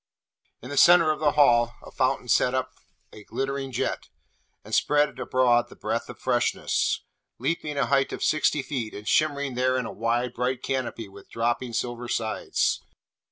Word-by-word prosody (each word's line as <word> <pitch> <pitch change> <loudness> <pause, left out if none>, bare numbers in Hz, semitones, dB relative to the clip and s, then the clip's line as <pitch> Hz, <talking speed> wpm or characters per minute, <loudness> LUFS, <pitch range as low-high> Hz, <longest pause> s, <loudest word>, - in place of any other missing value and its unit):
In 125 - -8
the 145 - -4
centre 170 0 +7
of 155 - -3
the 150 -2 +2
Hall 120 -5 +4
a - - -11
fountain 130 -1 0
set 125 +1 +3
up 130 0 -1 0.4
a 105 - -12
glittering 135 +3 -3
jet, - - -3 0.6
and - - -10
spread 150 0 +2
abroad 125 -2 +2
the - - -13
breath - - -3
of - - -9
freshness, - - 0 0.3
leaping 150 -3 -2
a 135 - +2
height 135 +2 +2
of - - -4
sixty 155 -2 +2
feet, 125 -8 -4
and 105 +1 -9
shimmering 145 -3 +1
there 130 +1 +1
in 125 - -2
a - - -5
wide 120 +2 -1
bright 125 +1 -2
canopy 130 -4 -3
with 100 0 -15
dropping 120 +1 -1
silver 120 +1 -3
sides. 110 -2 -1
130 Hz, 170 wpm, -26 LUFS, 120-140 Hz, 0.6 s, centre